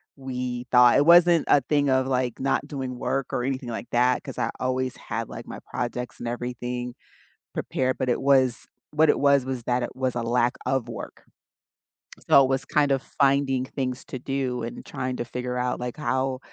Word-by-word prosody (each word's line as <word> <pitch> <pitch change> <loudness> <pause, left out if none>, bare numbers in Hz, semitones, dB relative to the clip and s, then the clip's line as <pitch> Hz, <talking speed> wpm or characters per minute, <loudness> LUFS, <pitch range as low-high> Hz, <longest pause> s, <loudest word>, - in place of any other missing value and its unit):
we 125 -2 -4
thought. 125 -1 +7
It 145 - +4
wasn't 170 -1 +6
a 145 - +6
thing 145 +1 +1
of, 130 0 +2
like, 125 -2 -1
not 135 +1 0
doing 130 -4 -5
work 135 +2 -2
or 125 - 0
anything 130 -1 -3
like 115 +1 -5
that, 125 +1 +2
'cause - - -8
I - - 0
always 130 0 -1
had, - - -4
like, - - -8
my - - -7
projects 125 0 -4
and 120 - -5
everything 125 0 -4 0.6
prepared, 130 0 -1
but 130 -1 0
it 120 - +1
was 130 -3 +3 0.3
what 155 0 +4
it - - +4
was 140 -2 +4
was 130 -3 -4
that 125 +1 0
it - - -5
was 130 -1 -1
a 120 - -1
lack 120 +1 +1
of 130 -3 0
work. 115 - -8 1.1
So, 140 - +8
it 130 - 0
was 135 +1 0
kind 145 -2 +2
of 135 - +2
finding 135 -2 +1
things 130 -1 -4
to 130 - -6
do 130 -2 -2
and 115 - -7
trying 130 0 -4
to 120 - -3
figure 125 +1 -4
out, 125 0 -1
like, 125 0 -5
how, 130 -1 -1
130 Hz, 200 wpm, -25 LUFS, 125-135 Hz, 1.1 s, So